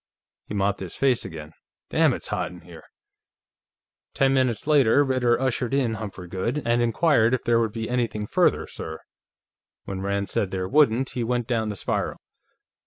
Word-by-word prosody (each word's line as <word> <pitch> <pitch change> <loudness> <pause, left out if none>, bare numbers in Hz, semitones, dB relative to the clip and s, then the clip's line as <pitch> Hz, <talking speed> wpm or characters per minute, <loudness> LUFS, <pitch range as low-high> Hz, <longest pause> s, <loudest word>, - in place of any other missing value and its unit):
He 105 - -5
mopped 100 0 0
his 95 -3 -7
face 130 -3 +2
again. 80 -4 -8 0.4
"Damn, - - +4
it's - - -4
hot 90 -1 -1
in 90 -1 -12
here!" 85 -2 -13 1.3
Ten 135 0 +3
minutes 130 -4 +1
later, 145 -3 +4
Ritter 125 -3 +2
ushered 130 -1 -1
in 125 -5 +1
Humphrey 100 -5 -7
Goode, 115 +11 -2
and 120 +1 +2
inquired 120 0 +3
if 125 - -6
there 115 0 +3
would 115 -2 0
be 115 0 -4
anything 120 -4 -1
further, - - +2
sir? 80 0 -8 0.8
When 95 -1 -5
Rand 100 0 -1
said 100 - 0
there 95 -1 -3
wouldn't, 135 -1 +3
he 120 - -2
went 120 0 -1
down 115 -3 -1
the 105 - -4
spiral. - - -2
115 Hz, 175 wpm, -25 LUFS, 100-130 Hz, 1.3 s, Damn